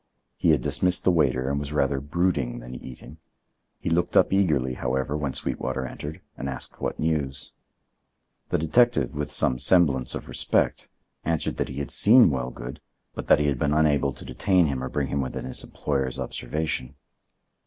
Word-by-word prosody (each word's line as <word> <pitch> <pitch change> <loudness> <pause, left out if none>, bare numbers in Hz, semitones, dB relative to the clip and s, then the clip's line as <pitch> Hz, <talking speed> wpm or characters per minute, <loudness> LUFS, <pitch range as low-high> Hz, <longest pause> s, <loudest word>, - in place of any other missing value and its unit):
He - - +1
had 75 -5 +4
dismissed 90 +7 +1
the 95 - +4
waiter 65 -6 +2
and 70 +1 0
was 70 0 -5
rather 70 -2 +1
brooding 75 -5 0
than - - -9
eating. 65 +4 -10 0.6
He - - -3
looked 85 +1 +1
up - - +4
eagerly, 75 -10 +2
however, 65 +3 -2
when 75 -3 -2
Sweetwater 65 -1 -2
entered, 75 +5 -7
and 70 - -4
asked 65 -2 -8
what - - -2
news. 70 -5 -2 1.0
The - - +1
detective, 80 - +2
with 75 -1 -3
some 65 0 +1
semblance 70 -7 +3
of - - -6
respect, - - 0 0.3
answered 80 -1 -1
that - - -1
he 65 - -7
had 70 - -4
seen 115 -4 +6
Wellgood, 65 -1 -5 0.3
but - - -7
that - - +6
he 75 - +1
had 70 -4 0
been 70 - +1
unable 75 -3 +3
to - - -11
detain 90 +8 +2
him 65 -4 -2
or 65 - -3
bring 70 -2 -2
him 70 - 0
within 65 - -4
his 65 - -4
employer's 65 -3 -2
observation. 70 -1 -3
70 Hz, 175 wpm, -25 LUFS, 65-80 Hz, 1.0 s, seen